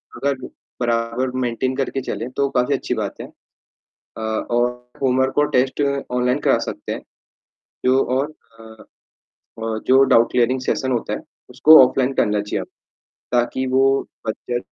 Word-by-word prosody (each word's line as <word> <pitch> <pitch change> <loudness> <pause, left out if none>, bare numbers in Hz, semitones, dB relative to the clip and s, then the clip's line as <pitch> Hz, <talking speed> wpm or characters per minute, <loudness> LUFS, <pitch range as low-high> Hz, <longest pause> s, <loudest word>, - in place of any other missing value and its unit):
अगर 140 0 -1 0.5
बराबर 120 +2 0
मेंटेन 130 +1 -1
करके 135 0 -2
चले 125 - -4
तो 140 0 +2
काफ़ी 125 +2 +1
अच्छी 125 - -3
बात 105 -3 -3
है - - -7
अ, - - -27 0.7
और 120 +2 0 0.3
होमवर्क 130 +1 +1
और 150 - +3
टेस्ट 130 +3 +1 0.3
ऑनलाइन 125 +2 +1
करा - - +3
सकते - - -7
हैं, - - -6 0.8
जो 130 +1 +4
और 145 +3 -1 0.3
अ, 110 0 -13 0.8
और 110 -1 -2
जो 135 +1 +6
डाउट 115 0 +5
क्लियरिंग 125 +1 +1
सेशन 130 0 -1
होते 120 - -2
है, - - -3 0.3
उसको 155 +1 +7
ऑफलाइन 130 +1 0
करना 105 -3 +1
चाहिए 105 - -3 0.7
ताकि 125 +2 0
वो 130 +1 +3 0.4
बच्चे 120 +2 -3
125 Hz, 145 wpm, -21 LUFS, 115-130 Hz, 0.8 s, उसको